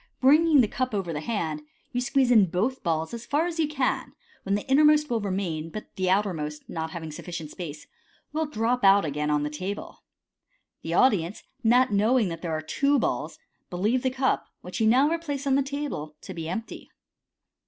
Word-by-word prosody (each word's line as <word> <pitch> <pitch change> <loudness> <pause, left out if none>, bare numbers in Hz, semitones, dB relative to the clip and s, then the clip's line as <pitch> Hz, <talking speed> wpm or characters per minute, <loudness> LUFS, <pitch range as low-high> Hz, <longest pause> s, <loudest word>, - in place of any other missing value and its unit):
Bringing 300 +2 +6
the 225 - +2
cup 255 0 -2
over 185 -4 -2
the 150 - -3
hand, 160 -7 -2 0.3
you 245 - -1
squeeze 250 0 +2
in 210 -6 +6
hoth 235 +9 -1
balls 160 +2 -1
as 235 0 -7
far 295 +3 +1
as 345 -1 -4
you 315 - +3
can, 275 -4 -1 0.3
when 195 +1 0
the 205 - -4
innermost 300 +1 +4
will 230 -2 +1
remain, 185 -5 -2
but 215 +6 -9
the 185 -1 0
outermost, 165 -7 -1
not 160 0 -4
having 160 -1 -6
sufficient 165 0 -7
space, 155 -4 -7 0.5
will 315 0 0
drop 245 -1 -1
out 195 -1 +6
again 150 0 -2
on 150 -1 +1
the 150 - -1
table. 185 +7 -6 0.8
The - - -3
audience, 200 -7 +2 0.2
not 240 0 +4
knowing 215 +1 +3
that 165 -1 -6
there 170 - -3
are - - -4
two 280 - +2
balls, 245 - -2 0.3
believe 210 +8 0
the 260 - +1
cup, 260 +1 0
which 180 +5 -6
you 220 - +4
now 255 +6 +5
replace 300 -4 -2
on 275 - +2
the 275 - +4
table, 275 - -4
to - - -8
be 165 -1 -5
empty. 225 +6 -6
215 Hz, 195 wpm, -26 LUFS, 165-265 Hz, 0.8 s, Bringing